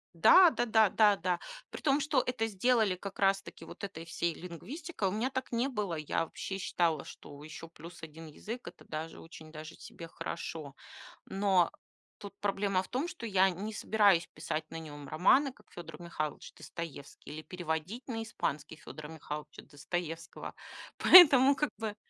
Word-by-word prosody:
Да 225 - +8
да 240 - -1
да 220 -2 +4
да 210 +1 +5
да, 180 0 -1 0.3
при - - -8
том, 280 -1 +3
что 295 -1 +1
это 225 -3 -1
сделали 220 -1 +2
как 195 +2 -8
раз-таки 195 0 0
вот - - -12
этой 175 -5 -6
всей 170 0 -1
лингвистикой. 200 - -5
У - - -4
меня 220 +6 -1
так 260 0 -4
не 240 +2 +1
было. 210 -9 -2
Я 155 +1 -1
вообще 190 +4 -6
считала, 170 -5 0
что 145 0 -12
еще 155 +1 -9
плюс 170 +2 -12
1 160 +1 -9
язык- 220 +11 -8
это 175 - -11
даже 160 +1 -6
очень 160 -1 -12
даже 155 +1 -9
себе 165 - -10
хорошо, 160 -3 -6 0.5
но 195 -3 +2 0.5
тут 200 -1 -9
проблема 195 -2 0
в - - -11
том, 265 +7 -2
что 345 -10 -7
я 190 -2 +4
не 205 +5 -5
собираюсь 205 -5 +3
писать 155 0 -3
на 165 - -5
нем 145 -3 -9
романы, 255 - +3
как 210 - -24
Федор 165 -2 -10
Михайлович 155 -3 -5
Достоевский, 155 -3 -9
или 155 +1 -7
переводить 175 +6 -4
на 225 -3 -3
испанский 155 -8 -4
Федора 155 -1 -10
Михайловича 150 -1 -7
Достоевского. 165 +2 -6 0.4
Поэтому 280 -6 +9
как 300 +2 0
бы. 215 -1 -4
180 Hz, 170 wpm, -31 LUFS, 160-220 Hz, 0.5 s, Поэтому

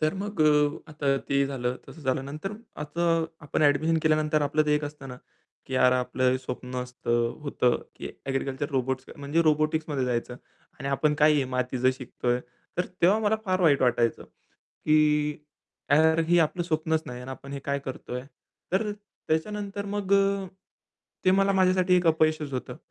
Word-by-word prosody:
तर 155 +4 +1
मग 205 -4 -4
अ, 150 0 +2
आता 140 -2 0
ते 140 0 +3
झालं 125 -2 -2
तसं 165 - -11
झालं. 130 0 0
नंतर 155 +9 -5 0.3
आता 160 +4 -3 0.4
आपण 145 - 0
ॲडमिशन 150 +3 +3
केल्यानंतर 155 -1 +2
आपलं 145 +2 +2
ते 150 - +3
एक 150 0 0
असतं 145 -2 -8
ना, 125 - -8 0.5
की 130 - -5
"यार 125 0 +5
आपलं 130 0 +1
स्वप्न 125 0 -6
असतं 120 -1 -1 0.2
होतं 125 -4 +1 0.2
की - - -6 0.2
ॲग्रीकल्चर 135 +1 -2
रोबोट्स 130 -1 -1
म्हणजे 145 +4 0
रोबोटिक्समध्ये 155 -2 +1
जायचं 125 0 -2 0.4
आणि 140 -1 -4
आपण 150 +2 +1
काय 155 0 +7
हे 140 -2 +2
मातीचं 125 0 +1
शिकतोय." 125 -1 -2 0.4
तर 180 - 0 0.2
तेव्हा 195 +5 +5
मला 220 0 +2
फार 185 -2 0
वाईट 150 -6 +4
वाटायचं, 120 -2 +1
की 150 -1 0 0.6
"यार 160 +2 +5
हे 175 0 +5
आपलं 165 +2 +1
स्वप्नच 160 -1 0
नाही 125 0 -7
आणि 125 - -8
आपण 140 +1 -9
हे 140 - -4
काय 140 0 +1
करतोय?" 130 -2 -6 0.5
तर 210 +3 +1 0.4
त्याच्यानंतर 200 +5 -2
मग 200 -1 -2
अ, 195 0 +2 0.8
ते 185 - +5
मला 195 +1 +3
माझ्यासाठी 185 -1 +3
एक 180 -1 +1
अपयशच 155 -2 +2
होतं. 130 - -4
150 Hz, 165 wpm, -27 LUFS, 130-165 Hz, 0.8 s, काय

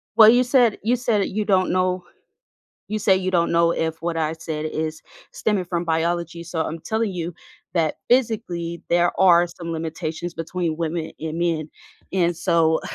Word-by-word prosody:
Well, 220 -1 +9
you 245 +2 +5
said 245 -3 +3
you 235 +3 +2
said 230 -5 +1
you 210 +1 -2
don't 190 -2 +2
know 185 0 +1 0.8
you 215 +1 -2
say 200 -2 +4
you 185 0 -1
don't 170 -2 +2
know 170 0 +4
if 160 -1 -2
what 170 0 -2
I 160 -1 0
said 160 -1 -5
is 155 0 -3 0.3
stemming 205 -4 -1
from 175 -1 -2
biology, 170 0 -1
so 170 -1 -3
I'm 160 +1 -3
telling 220 +4 -1
you 175 -1 -4 0.4
that, 165 -4 +1
physically, 205 -9 0
there 175 0 +2
are 175 -2 +6
some 170 -1 -7
limitations 165 +1 -4
between 165 0 -3
women 165 0 -3
and 160 +1 -4
men, 165 -3 0 0.4
and 175 -2 +1
so 160 -1 +2
170 Hz, 170 wpm, -22 LUFS, 165-190 Hz, 0.8 s, Well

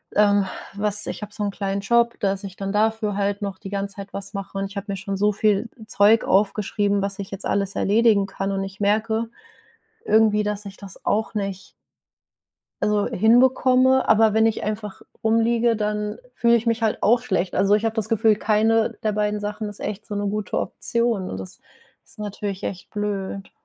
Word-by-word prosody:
ähm, 205 -1 +4 0.3
was 210 +1 0
ich - - -5
habe 210 0 -7
so 210 - -4
'n 205 - -1
kleinen 195 0 -3
Job, 235 +3 +2
dass 195 -1 0
ich 190 -2 -7
dann 195 0 -3
dafür 215 -1 +1
halt 200 0 -1
noch 200 -2 -4
die 195 - -8
ganze 200 0 -4
Zeit 200 0 -8
was 200 +1 -6
mache 195 -1 -6
und 195 - -1
ich 200 - -14
habe 200 +1 -5
mir 195 - -2
schon 195 +1 -4
so 210 +2 +3
viel 210 +2 +1 0.2
Zeug 215 +1 +4
aufgeschrieben, 200 0 +1
was 200 0 -3
ich 195 0 -6
jetzt 195 0 -5
alles 200 -1 -1
erledigen 210 -1 +3
kann 195 0 -4
und 195 0 -1
ich 195 0 -8
merke 220 +2 +1 0.8
irgendwie, 215 - +4
dass 210 0 -3
ich 195 0 -9
das 195 -3 -11
auch 215 +1 0
nicht 195 -2 -4 1.1
also 210 -1 +2
hinbekomme. 255 +4 +4
Aber 220 0 +5
wenn 220 +1 +4
ich 225 - -1
einfach 210 -1 -5 0.2
rumliege, 230 +1 +2
dann 210 0 -2 0.2
fühle 235 -1 +4
ich 230 - -3
mich 230 0 +1
halt 220 -1 0
auch 235 +3 +4
schlecht. 190 -7 -1
Also, 195 +2 +3
ich 215 +1 +1
habe 225 -1 0
das 220 -2 -2
Gefühl, 220 -1 +3
keine 220 +1 +2
der 215 - +1
beiden 210 0 0
Sachen 210 +1 -4
ist 205 - -9
echt 210 0 -5
so 210 - -5
'ne 205 0 -2
gute 210 +1 -2
Option, 235 -5 -1
und 95 - -5
das 95 -1 -9 0.5
ist - - -12
natürlich 205 -2 -5
echt 185 -2 -6
blöd. 200 -2 -4
210 Hz, 200 wpm, -23 LUFS, 200-220 Hz, 1.1 s, Aber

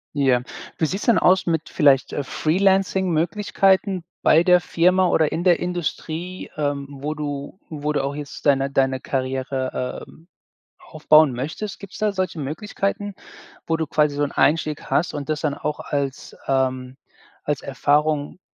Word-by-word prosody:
Ja. 135 -4 +3 0.4
Wie 160 - +1
sieht's 195 +6 -3
denn 235 - +4
aus 185 +1 +4
mit 165 -2 -1
vielleicht, 140 -3 +3
äh, 145 - -2
Freelancing-Möglichkeiten 190 +2 +1 0.2
bei 160 +2 +5
der 180 0 +5
Firma 180 +2 +2
oder 160 -3 +2
in 170 - -2
der 175 -2 +5
Industrie, 175 0 -4
ähm, 145 -2 -1
wo 145 +2 -4
du 145 +3 -5
wo 150 -1 -3
du 145 - 0
auch 140 +1 -2
jetzt 145 0 -8
deine 135 -1 +3
deine 135 -1 +1
Karriere, 130 -1 -3
ähm, 165 - -19 0.5
aufbauen 155 -2 +4
möchtest? 160 - -5
Gibt's 200 -1 -10
da 215 -1 0
solche 185 -3 -2
Möglichkeiten, 195 +6 -3 0.5
wo 165 - +1
du 160 -1 -1
quasi 150 0 +1
so 145 - 0
'n 140 - -1
Einstieg 155 -1 +1
hast 165 - +1
und 145 -1 -5
das 155 -1 -2
dann 145 -3 -1
auch 150 +1 -4
als, 140 -2 -4
ähm 130 -1 0 0.5
als 145 -2 -1
Erfahrung, 145 +3 0
155 Hz, 155 wpm, -22 LUFS, 140-180 Hz, 0.5 s, bei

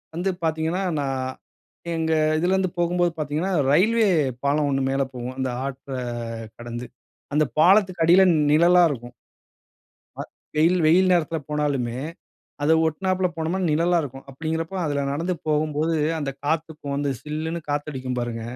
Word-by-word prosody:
வந்து 180 +3 -1
பார்த்தீங்கன்னா, 160 +4 0 0.2
நான் 130 -2 -2 0.6
எங்க 160 0 -1 0.3
இதிலிருந்து 185 +1 +1
போகும்போது 175 0 +2
பார்த்தீங்கன்னா 155 +5 -2 0.2
ரெயில்வே 220 +8 +4 0.4
பாலம் 145 +1 +2
ஒன்னு 135 0 +1
மேலே 135 0 +1
போகும். 125 +1 -5
அந்த 130 -1 0 0.2
ஆத்த 135 -1 -6 0.6
கடந்து 120 +1 -6 0.5
அந்த 155 0 +4 0.2
பாலத்துக்கு 185 -1 +4
அடியில 180 +3 +7 0.3
நிழலா 175 +3 +6
இருக்கும். 120 -2 -6 1.0
அ - - -3 0.3
வெயில் 170 +4 +3
வெயில் 185 +4 +5
நேரத்தில 165 -1 +1
போனாலுமே 135 -5 -1 0.6
அதை 160 +2 +4
ஒட்டினாப்புல 185 +3 0
போனா 165 +4 -1
நிழலா 170 +3 +2
இருக்கும். 135 -1 -8
அப்படிங்கிறப்போ 160 +5 -3
அதில 145 -1 -1
நடந்து 170 +6 -1
போகும்போது 155 +1 +1 0.2
அந்த 140 -2 -2
காத்துக்கு 155 -1 -2
வந்து 140 0 -1
"சில்லுன்னு" 160 +2 -4
காத்து 145 +1 -2
அடிக்கும் 130 -1 -4
பாருங்க. 120 -1 -3
155 Hz, 135 wpm, -23 LUFS, 140-175 Hz, 1.0 s, அடியில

